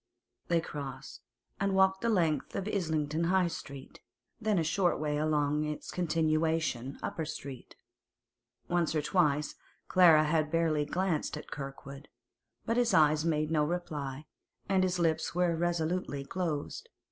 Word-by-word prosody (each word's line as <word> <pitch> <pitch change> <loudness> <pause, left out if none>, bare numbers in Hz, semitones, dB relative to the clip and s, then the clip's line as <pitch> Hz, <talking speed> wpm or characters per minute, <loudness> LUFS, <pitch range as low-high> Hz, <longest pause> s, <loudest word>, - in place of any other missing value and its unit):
They 170 -1 +3
crossed, 145 -4 -7 0.4
and 195 -1 +1
walked 190 0 +3
the 235 - +1
length 170 -8 +1
of 195 - -2
Islington 160 -5 -1
High 185 0 +3
Street, 140 -4 -9 0.4
then 215 -3 +1
a 165 - +2
short 175 +3 +1
way 150 -1 -1
along 150 -1 +1
its 150 0 -5
continuation, 160 -5 0
Upper 160 - -3
Street. 140 -4 -8 0.9
Once 170 -2 0
or 150 - +1
twice 150 -4 +1 0.3
Clara 170 -4 +6
had 155 0 +1
barely 160 -2 +1
glanced 170 -2 -1
at 150 - -10
Kirkwood, 140 0 -8 0.6
but 230 +1 0
his 235 -5 +3
eyes 155 -1 +4
made 155 -1 0
no 155 -2 +3
reply, 150 -4 -4 0.4
and 195 -1 +2
his 185 -1 +1
lips 160 -1 0
were 175 -1 +2
resolutely 170 -3 -1
closed. 160 -2 -3
160 Hz, 140 wpm, -31 LUFS, 150-180 Hz, 0.9 s, Clara